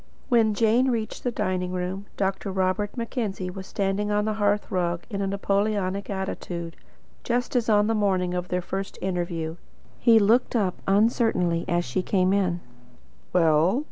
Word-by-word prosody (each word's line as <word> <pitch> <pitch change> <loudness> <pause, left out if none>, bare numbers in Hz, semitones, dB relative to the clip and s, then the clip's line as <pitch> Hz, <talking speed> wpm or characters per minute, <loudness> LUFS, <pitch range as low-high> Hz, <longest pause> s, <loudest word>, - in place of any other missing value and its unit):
When 225 -4 +3
Jane 230 +4 +3
reached 225 -3 -3
the 245 - +1
dining 185 -4 -2
room, 185 +2 -3
Dr. 195 0 -1
Robert 190 +4 -1
Mackenzie 215 -6 -3
was 190 +1 -8
standing 200 +1 -1
on 210 0 +1
the 215 - 0
hearth 205 0 +1
rug 175 -2 -1
in 200 -1 -2
a 195 - 0
Napoleonic 200 0 0
attitude, 175 -3 -4 0.5
just 245 +2 -1
as 240 -2 +1
on 210 -1 +4
the 225 - +1
morning 190 -4 +1
of 180 0 -2
their 180 -1 -1
first 195 +2 -4
interview. 175 -3 -3 0.4
He 230 -2 +6
looked 225 +5 +3
up 195 -5 0
uncertainly 195 -5 +2
as 175 0 +1
she 125 +9 -1
came 185 0 +2
in. 180 -3 +1 0.7
"Well?" 165 - +3
195 Hz, 160 wpm, -25 LUFS, 180-215 Hz, 0.7 s, He